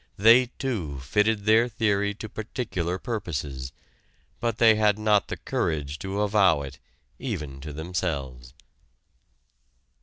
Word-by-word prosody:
They 115 +5 +6
too 90 - -3
fitted 105 +10 +1
their 110 +2 +5
theory 100 -3 0
to 110 - -7
particular 100 -5 -3
purposes, 75 - -4 0.7
but 115 -2 -1
they 115 -1 +6
had 105 -1 +3
not 105 -1 +2
the - - -5
courage 75 -2 -2
to 95 +2 -3
avow 100 -8 +3
it 65 -2 -9 0.4
even 75 - -5
to 75 +2 -7
themselves. 70 -6 -4
100 Hz, 120 wpm, -26 LUFS, 75-110 Hz, 0.7 s, They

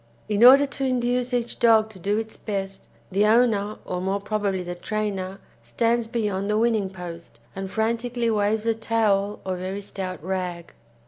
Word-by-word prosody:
In 210 +1 +2
order 270 +3 +9
to 275 0 -6
induce 250 -1 0
each 240 -1 -2
dog 220 -2 +4
to 190 - -13
do 205 +4 0
its 220 0 -4
best, 195 -2 -5 0.2
the 200 +3 +3
owner, 215 -2 +3
or 180 0 -3
more 195 +2 -1
probably 200 -2 -1
the 175 0 -5
trainer 195 0 -3 0.2
stands 235 0 0
beyond 210 -4 -2
the 210 - +2
winning 220 -4 +1
post, 170 -8 -9 0.2
and 195 0 -5
frantically 230 +2 0
waves 210 +1 +1
a 230 - +3
towel 215 -3 0
or 185 -1 -2
very 190 +2 -4
stout 190 -2 -5
rag. 180 -2 -4
210 Hz, 170 wpm, -24 LUFS, 190-230 Hz, 0.2 s, order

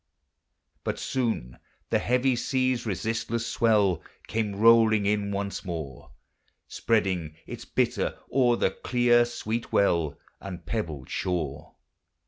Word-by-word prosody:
But - - -2
soon 115 - -2 0.3
the - - +3
heavy 125 +1 +2
sea's 130 -1 0
resistless 110 +3 -2
swell 105 -7 +2 0.2
Came 110 -2 -2
rolling 110 -1 +5
in 100 0 +1
once 100 0 -3
more, 80 -8 -6 0.6
Spreading 95 -8 0
its - - -8
bitter - - 0 0.2
o'er 125 -3 +4
the 95 - +1
clear 120 +2 +3
sweet 115 -1 -4
well 85 -7 +2 0.2
And 90 -4 -8
pebbled 80 - -4
shore. 75 -5 -3
105 Hz, 110 wpm, -27 LUFS, 90-115 Hz, 0.6 s, rolling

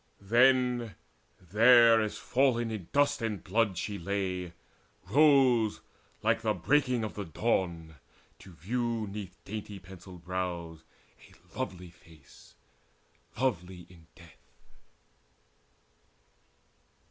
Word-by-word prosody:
Then, 120 0 +2 0.4
there 115 +4 +5
as 110 -1 -3
fallen 120 -3 +1
in 100 -6 -6
dust 145 -1 +2
and 105 -6 -3
blood 100 -1 0
she 100 +2 -4
lay, 90 -1 -3 0.5
Rose, 130 -3 +4 0.4
like - - +1
the - - 0
breaking 125 -5 +1
of 110 - -4
the 105 - -5
dawn, 85 -4 -2 0.4
to 95 - -14
view 115 - -2
'Neath 100 -3 -8
dainty 105 0 -7
pencilled 90 -2 -13
brows 85 -2 -4 0.5
a - - -24
lovely 90 -1 -5
face, 80 -4 -20 0.8
Lovely 90 -8 -2
in 85 -3 -18
death. 75 -9 -20
100 Hz, 100 wpm, -29 LUFS, 90-120 Hz, 0.8 s, there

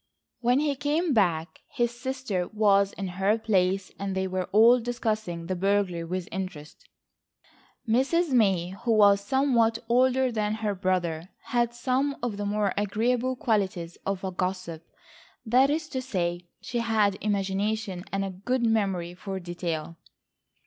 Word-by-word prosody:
When 245 +2 +3
he 295 -1 +1
came 295 +4 0
back 175 -7 +1
his 240 -3 -1
sister 250 -8 -3
was 200 -2 +3
in 195 - -4
her 195 +4 +1
place 195 -4 +1
and 195 -1 -3
they 190 0 0
were 185 -1 -2
all 230 +6 +6
discussing 215 -7 -3
the 185 +2 -2
burglary 190 -2 0
with 180 +1 -4
interest. 175 -5 -7 1.0
Mrs. 275 +8 +2
May, 195 -8 +3
who 225 +5 -1
was 200 -2 +5
somewhat 235 -2 +2
older 255 +2 +3
than 215 -1 -1
her 215 -2 -1
brother, 180 -3 -1 0.2
had 240 -1 +1
some 265 +3 0
of 230 -4 -2
the 205 0 -2
more 205 -1 0
agreeable 235 +5 0
qualities 190 -8 -1
of 195 -1 -3
a 190 - -2
gossip, 180 -3 -3 0.6
that 255 +4 +4
is 310 +2 -1
to 260 - -3
say 175 -8 -2
she 240 - -3
had 220 -4 +2
imagination 200 -1 -1
and 195 0 -1
a 195 - -4
good 240 +7 -1
memory 195 -6 0
for 190 +1 -6
detail. 170 -2 -4
205 Hz, 150 wpm, -27 LUFS, 185-240 Hz, 1.0 s, all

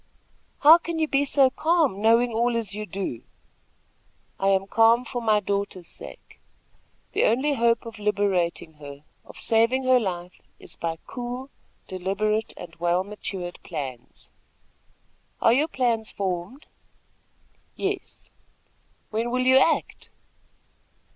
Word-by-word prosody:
"How 315 +4 +9
can 335 -1 -4
you 315 -1 +1
be 280 0 +1
so 270 -2 +4
calm, 310 - +1
knowing 230 +2 +4
all 235 +1 +1
as 215 -4 -4
you 210 +1 -5
do?" 185 -11 -4 1.2
"I 195 - +1
am 195 0 +3
calm 230 +4 +4
for 245 0 -4
my 215 -2 +3
daughter's 200 -3 -3
sake. - - -13 0.7
The - - +2
only 265 +7 +2
hope 235 -3 +2
of 225 -1 -9
liberating 195 -6 0
her, 145 0 -10 0.2
of - - -13
saving 230 +3 +2
her 255 -1 +5
life, 180 -4 -5 0.2
is - - -13
by 165 -1 -3
cool, 250 +2 -6 0.4
deliberate 205 +4 -1
and - - -9
well 175 +2 +1
matured 190 -3 -6
plans." 130 -6 -8 1.1
"Are 230 - +4
your 290 +5 +2
plans 235 -7 0
formed?" 190 - -4 1.1
"Yes." 390 -1 -5 0.8
"When 225 +2 -1
will 255 +1 0
you 260 +1 +6
act?" 310 +4 +1
225 Hz, 130 wpm, -25 LUFS, 190-255 Hz, 1.2 s, How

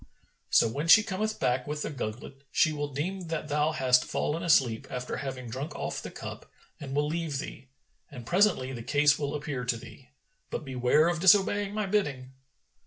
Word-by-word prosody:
So - - +5
when 140 +8 -3
she 210 +5 +8
cometh 215 +1 -3
back 125 +1 0
with 150 0 -3
the - - -4
gugglet, 130 +1 -6
she 155 - +3
will 145 -1 -3
deem 175 +6 -4
that 160 -1 -4
thou 150 +2 +1
hast 130 -4 +3
fallen 160 +3 -2
asleep, 130 -9 +2
after 125 0 -4
having 130 -3 -5
drunk 135 +7 -5
off - - -4
the - - -7
cup, - - -9 0.3
and 135 -1 -6
will 145 +1 +2
leave 160 -2 -2
thee; 135 -1 -7 0.4
and 120 -2 -10
presently 170 - +2
the 120 - -6
case 145 +3 +3
will 145 0 -2
appear 145 -3 -4
to 125 -1 -1
thee; 125 +3 -13 0.4
but - - -5
beware 130 +4 +2
of 170 -1 0
disobeying 200 +2 +4
my 215 -1 0
bidding." 150 -11 -1
145 Hz, 185 wpm, -28 LUFS, 130-165 Hz, 0.4 s, she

